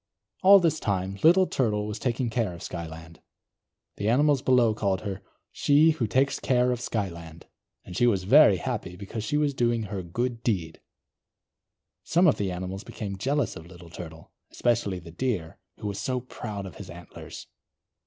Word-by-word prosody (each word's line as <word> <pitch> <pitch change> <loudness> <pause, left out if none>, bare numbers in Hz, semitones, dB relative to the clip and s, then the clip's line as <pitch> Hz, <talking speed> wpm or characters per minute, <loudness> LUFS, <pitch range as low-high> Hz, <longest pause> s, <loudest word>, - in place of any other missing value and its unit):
All 195 +1 +8
this 160 -4 +1
time, 95 -1 -2
Little 180 +4 +6
Turtle 105 -10 0
was 105 0 -5
taking 120 0 -1
care 110 -6 -1
of 85 - -10
Skyland. 80 -1 -8 0.8
The 100 - -1
animals 140 +2 +3
below 125 -4 +4
called 100 -3 -1
her, 100 -2 -5 0.3
She 150 +3 +4
Who 135 -8 -1
Takes 135 +5 +1
Care 125 -1 +2
of 120 -1 -2
Skyland. 85 -8 -5 0.4
And 90 - -9
she 120 - +3
was 100 -6 +1
very 140 +11 +6
happy, 110 -8 -4
because 100 +4 -6
she 145 +7 -1
was 150 -1 +1
doing 120 -3 +1
her 100 -2 -4
good 115 +7 -3
deed. 90 -9 -2 1.2
Some 175 +3 +3
of 155 - +4
the 100 -2 -1
animals 95 +3 -5
became 100 -3 -6
jealous 140 +3 0
of 80 - -10
Little 85 -2 -13
Turtle, 80 -2 -10 0.2
especially 115 -6 0
the 85 -1 -11
Deer, 90 -4 -3 0.2
who - - -9
was 100 -1 -3
so 130 -1 -1
proud 110 -5 -7
of 95 - -10
his 95 -3 -9
antlers. 85 0 -10
105 Hz, 175 wpm, -26 LUFS, 90-125 Hz, 1.2 s, All